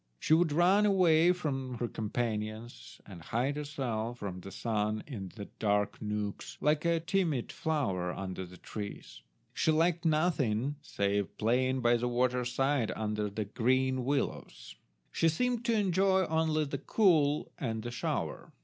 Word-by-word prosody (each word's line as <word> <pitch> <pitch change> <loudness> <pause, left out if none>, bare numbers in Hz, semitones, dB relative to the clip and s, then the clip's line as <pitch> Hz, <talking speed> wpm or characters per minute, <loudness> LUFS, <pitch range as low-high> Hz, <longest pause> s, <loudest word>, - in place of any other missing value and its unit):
She 155 - +1
would 165 -1 +4
run 185 +7 +4
away 175 -4 +5
from 135 -8 -3
her 120 0 -2
companions, 110 +1 -4
and 95 -4 -11
hide 125 - -1
herself 125 -6 -3
from 95 -5 -5
the 95 - -9
sun 105 0 -1
in 100 -10 -7 0.3
dark 105 0 0
nooks, 105 -1 -4
like 150 +2 +1
a 170 -1 +3
timid 165 -7 0
flower 100 - -1
under 95 -1 -5
the 90 +1 -13
trees. 100 - -8 0.3
She - - +1
liked 165 +2 +2
nothing 145 -6 +1
save 100 -7 -1
playing 130 +4 +1
by 120 0 +4
the 120 +1 -1
water 125 0 +1
side 135 -1 +1
under 105 -1 -2
the 105 +1 -3
green 130 +4 +1
willows. 135 - -3 0.4
She 165 - +3
seemed 240 +8 0
to 235 - +2
enjoy 190 -1 +3
only 160 -1 +1
the 140 -1 -4
cool 155 -6 +2
and 110 -5 -3
the 120 - -4
shower. 120 - -3
130 Hz, 150 wpm, -31 LUFS, 110-160 Hz, 0.4 s, away